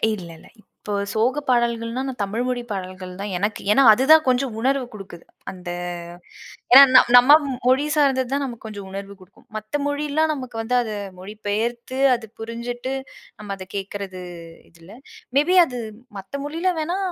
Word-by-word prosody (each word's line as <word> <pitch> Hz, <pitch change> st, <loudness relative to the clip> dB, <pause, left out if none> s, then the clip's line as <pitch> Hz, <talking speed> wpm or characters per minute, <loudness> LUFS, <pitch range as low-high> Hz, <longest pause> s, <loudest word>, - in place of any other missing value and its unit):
இல்லல்ல, 170 Hz, -4 st, -11 dB, 0.3 s
இப்போ 210 Hz, -, -5 dB, 0.2 s
சோகப் 255 Hz, +7 st, 0 dB
பாடல்கள்னா, 235 Hz, 0 st, 0 dB
நான் 255 Hz, -3 st, -6 dB
தமிழ் 205 Hz, +4 st, -2 dB
மொழி 250 Hz, -1 st, -1 dB
பாடல்கள் 185 Hz, -1 st, -6 dB
தான் 200 Hz, -1 st, -4 dB
எனக்கு. 205 Hz, +3 st, -2 dB
ஏன்னா, 245 Hz, -, +5 dB
அதுதான் 310 Hz, +7 st, +5 dB
கொஞ்சம் 255 Hz, -2 st, +1 dB
உணர்வு 265 Hz, +2 st, +1 dB
குடுக்குது. 195 Hz, -5 st, -11 dB, 0.3 s
அந்த 180 Hz, -2 st, -9 dB, 1.0 s
ஏன்னா, 270 Hz, -, +12 dB
நம் 255 Hz, -, +7 dB
நம்ம 270 Hz, +5 st, +8 dB, 0.3 s
மொழி 260 Hz, +3 st, +3 dB
சார்ந்தது 265 Hz, -4 st, +2 dB
தான், 280 Hz, 0 st, 0 dB
நமக்கு 235 Hz, -3 st, -8 dB
கொஞ்சம் 205 Hz, -3 st, -8 dB
உணர்வு 195 Hz, +1 st, -7 dB
குடுக்கும். 185 Hz, +1 st, -20 dB
மத்த 215 Hz, +7 st, -4 dB
மொழிலாம், 300 Hz, +2 st, 0 dB
நமக்கு 255 Hz, -5 st, -7 dB
வந்து, 235 Hz, +3 st, -1 dB
அத 220 Hz, -3 st, -4 dB, 0.3 s
மொழி 200 Hz, +3 st, -9 dB
பெயர்த்து, 235 Hz, +5 st, -2 dB, 0.2 s
அது 230 Hz, -2 st, -8 dB
புரிஞ்சுட்டு, 240 Hz, +3 st, -5 dB, 0.5 s
நம்ம 205 Hz, -2 st, -5 dB
அத 185 Hz, -1 st, -10 dB
கேட்கிறது, 195 Hz, -1 st, -6 dB, 0.6 s
இல்ல. 165 Hz, +2 st, -17 dB, 0.5 s
மே 285 Hz, -, +5 dB
பி 370 Hz, -, +4 dB
அது 250 Hz, -5 st, -6 dB, 0.4 s
மத்த 195 Hz, +9 st, -7 dB
மொழியில 330 Hz, +5 st, -1 dB
வேணா 340 Hz, +4 st, -2 dB
235 Hz, 160 wpm, -22 LUFS, 200-265 Hz, 1.0 s, ஏன்னா